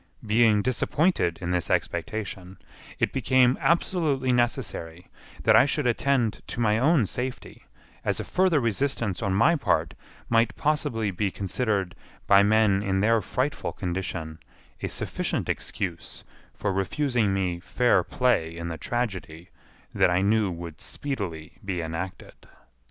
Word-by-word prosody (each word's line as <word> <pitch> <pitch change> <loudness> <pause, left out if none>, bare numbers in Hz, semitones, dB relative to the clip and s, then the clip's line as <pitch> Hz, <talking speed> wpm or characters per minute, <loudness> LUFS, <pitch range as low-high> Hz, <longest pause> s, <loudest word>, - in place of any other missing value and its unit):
Being 110 -1 +4
disappointed 130 - +1
in 90 - -2
this 90 -3 -1
expectation, 95 -3 -3 0.4
it - - 0
became 130 0 +3
absolutely 155 -7 +1
necessary 90 -8 -1 0.4
that - - +5
I - - +7
should 145 0 -1
attend 120 -2 +1
to - - -6
my 110 -2 +2
own 140 -2 +4
safety, 125 +6 -6 0.4
as - - -1
a - - -2
further 185 -4 +2
resistance 115 -4 -1
on 100 -3 0
my 155 - +4
part 145 - 0 0.3
might 115 0 +2
possibly 145 -8 0
be 95 +2 -1
considered 100 -1 -2 0.3
by 100 0 +6
men 105 -1 +3
in 95 -1 0
their 115 +1 +3
frightful 135 +7 -2
condition 85 -3 -4 0.4
a - - -1
sufficient - - -3
excuse 90 -4 -4 0.3
for 100 -2 -2
refusing 110 +3 0
me 95 -3 -1
fair 120 +7 +2
play 85 -11 0
in 85 0 -4
the 80 -2 -6
tragedy 95 - -4 0.4
that - - +3
I 90 +2 +2
knew 105 0 +2
would 85 -2 -7
speedily 95 - -5
be 95 -3 -3
enacted. 85 +3 -5
105 Hz, 135 wpm, -26 LUFS, 90-125 Hz, 0.4 s, I